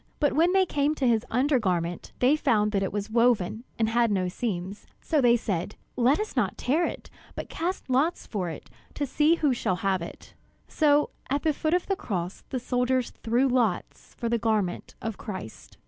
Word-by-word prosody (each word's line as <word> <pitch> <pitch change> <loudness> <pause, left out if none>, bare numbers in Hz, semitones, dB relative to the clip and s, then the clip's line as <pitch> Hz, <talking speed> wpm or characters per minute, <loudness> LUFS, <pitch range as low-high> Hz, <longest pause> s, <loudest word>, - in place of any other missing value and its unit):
But 290 - +2
when 330 +5 +4
they 380 0 +4
came 295 -2 0
to 270 -4 +1
his 235 0 +2
undergarment, 210 - 0
they 260 +4 +4
found 210 -8 +2
that 200 -2 +1
it 195 - -1
was 205 +1 -4
woven 230 -2 +2
and 225 - +2
had 235 +1 +2
no 185 -3 0
seams; 195 -1 -4
so 310 -3 +1
they 240 -1 +5
said, 200 -3 -3 0.2
"Let 255 +7 +3
us 430 -6 -4
not 215 -8 0
tear 310 +7 +1
it, - - -8 0.2
but - - -6
cast 355 +3 -3
lots 275 +7 +1
for 185 -5 -3
it, 160 - -8 0.3
to 290 - -1
see 300 +5 +3
who 295 -5 +2
shall 190 -6 0
have 190 -2 +2
it." 170 - -9 0.3
So 295 -1 +3 0.2
at 280 +2 0
the 315 -2 +2
foot 310 +4 0
of 360 - 0
the 390 - 0
cross 180 - -4
the 255 - -2
soldiers 250 0 0
threw 240 +4 +2
lots 240 -8 -1
for 235 - -3
the 235 0 +1
garment 215 -5 -1
of 225 -2 -4
Christ. 185 - -8
240 Hz, 195 wpm, -27 LUFS, 205-285 Hz, 0.3 s, they